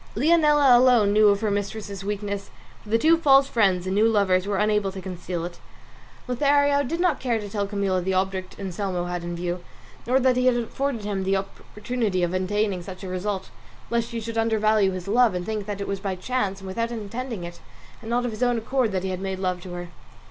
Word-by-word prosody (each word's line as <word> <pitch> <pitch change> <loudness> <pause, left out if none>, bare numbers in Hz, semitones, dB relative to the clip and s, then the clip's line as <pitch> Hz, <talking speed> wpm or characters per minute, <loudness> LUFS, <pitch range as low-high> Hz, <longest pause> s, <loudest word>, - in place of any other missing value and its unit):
Leonela 295 -1 +5
alone 240 -5 +5
knew 215 0 +6
of 200 0 +3
her 215 -2 0
mistress's 200 -1 -4
weakness, 200 0 -4 0.3
for 210 - -15
the 225 - +3
two 325 +7 +4
false 275 -3 +5
friends 195 -8 +2
and 190 - -1
new 215 +3 +4
lovers 200 -4 +2
were 205 -1 0
unable 210 -1 +1
to 190 - -7
conceal 180 -2 -5
it. 175 0 -8 0.7
Lothario 285 +2 +3
did 330 +6 -3
not 360 0 +2
care 240 -3 0
to 210 - -6
tell 200 -1 -2
Camilla 195 -2 0
the 190 +2 -1
object 190 0 -2
Anselmo 190 -2 -3
had 175 -1 -4
in 175 0 -4
view, 175 +1 -3 0.4
nor 255 +2 +3
that 255 -1 +3
he 250 0 +2
had 250 - +4
afforded 240 0 -2
him 200 -2 -2
the 195 +1 +1
opportunity 205 0 -3
of 175 +1 0
attaining 190 +1 0
such 185 +2 -9
a - - -5
result, 190 +1 -3 0.4
lest 235 0 0
she 235 -1 -4
should 225 0 -3
undervalue 215 -2 +3
his 185 0 -5
love 230 -1 +3
and 180 0 -3
think 215 -1 -3
that 205 -1 -4
it 200 - -4
was 195 -1 -2
by 195 -1 -3
chance 195 -1 -2
and 190 - -9
without 230 +5 -2
intending 230 -1 -5
it 175 0 -8 0.4
and 220 - -8
not 245 +1 +1
of 245 - -2
his 215 - -8
own 245 -1 +2
accord 235 0 0
that 185 -1 -1
he 190 - -2
had 185 0 -4
made 190 -1 -3
love 185 -1 -2
to 180 -1 -8
her. 175 0 -6
205 Hz, 225 wpm, -24 LUFS, 190-235 Hz, 0.7 s, knew